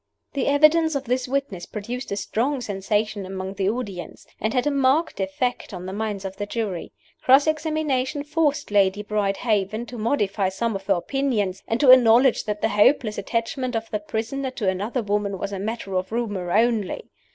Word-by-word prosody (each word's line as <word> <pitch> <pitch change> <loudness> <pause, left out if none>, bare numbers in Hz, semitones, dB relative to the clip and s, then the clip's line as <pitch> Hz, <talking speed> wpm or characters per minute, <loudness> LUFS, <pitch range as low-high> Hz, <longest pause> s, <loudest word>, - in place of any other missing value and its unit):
The 275 - -1
evidence 305 +2 +4
of 275 - -1
this 250 0 -1
witness 260 -10 -2
produced 235 +4 -6
a - - 0
strong 250 +7 -1
sensation 210 -1 -1
among 190 0 -5
the 195 -1 0
audience, 200 -7 -5
and 220 - 0
had 250 0 +1
a 295 - +2
marked 275 +2 +2
effect 195 +3 -2
on 180 0 -7
the 190 - -5
minds 205 -2 -3
of 190 0 -6
the 205 - -4
jury. 205 -6 -3 0.3
Cross 270 +2 +6
examination 305 -3 0
forced 295 -3 0
Lady 200 0 +3
Brydehaven 210 +1 0
to 240 -1 -8
modify 205 -4 +1
some 225 +3 -2
of 195 0 -6
her 195 - +4
opinions, 210 -3 -1
and 225 - 0
to 270 -3 +8
acknowledge 245 0 +6
that 210 -1 -3
the 220 - +2
hopeless 215 0 +3
attachment 235 +4 -2
of 225 0 -3
the 210 - -1
prisoner 225 +6 -3
to 245 -6 -4
another 205 +6 -1
woman 205 -1 -1
was 200 +2 -4
a 195 - -3
matter 210 -1 -4
of 185 +1 -1
rumor 205 -7 -2
only. 225 -1 +1
220 Hz, 185 wpm, -24 LUFS, 200-260 Hz, 0.3 s, to